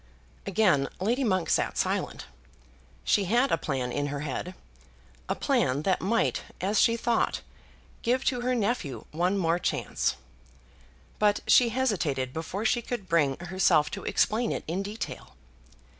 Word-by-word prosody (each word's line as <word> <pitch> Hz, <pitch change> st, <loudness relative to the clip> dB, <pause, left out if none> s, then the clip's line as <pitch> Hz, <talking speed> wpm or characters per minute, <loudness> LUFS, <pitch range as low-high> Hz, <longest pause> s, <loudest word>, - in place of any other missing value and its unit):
Again 185 Hz, -9 st, +3 dB
Lady 235 Hz, +8 st, +1 dB
Monk 185 Hz, -7 st, +1 dB
sat -, -, +1 dB
silent. -, -, -1 dB, 0.8 s
She 200 Hz, -, +2 dB
had 240 Hz, +8 st, +2 dB
a -, -, +5 dB
plan 130 Hz, -4 st, -2 dB
in 145 Hz, +3 st, -1 dB
her 145 Hz, 0 st, -4 dB
head, 155 Hz, +6 st, -4 dB, 0.7 s
a -, -, +1 dB
plan 155 Hz, -, +1 dB
that 190 Hz, +1 st, +1 dB
might, 225 Hz, +4 st, +1 dB, 0.2 s
as 200 Hz, +4 st, +2 dB
she 230 Hz, 0 st, +4 dB
thought, 235 Hz, 0 st, 0 dB, 0.6 s
give 250 Hz, +3 st, 0 dB
to 250 Hz, -2 st, +1 dB
her 250 Hz, +1 st, 0 dB
nephew 200 Hz, -, -2 dB
one 180 Hz, +5 st, +1 dB
more 170 Hz, -2 st, +1 dB
chance. -, -, -1 dB, 1.0 s
But 205 Hz, -1 st, +3 dB
she 245 Hz, -2 st, +6 dB
hesitated 165 Hz, -, -1 dB
before 175 Hz, +6 st, -4 dB
she 240 Hz, +2 st, +2 dB
could 235 Hz, -5 st, -5 dB
bring 150 Hz, -6 st, +2 dB
herself 175 Hz, -3 st, +2 dB
to -, -, -6 dB
explain 225 Hz, +2 st, +1 dB
it -, -, -3 dB
in 175 Hz, +5 st, -1 dB
detail. 205 Hz, -, -6 dB
190 Hz, 145 wpm, -28 LUFS, 155-230 Hz, 1.0 s, she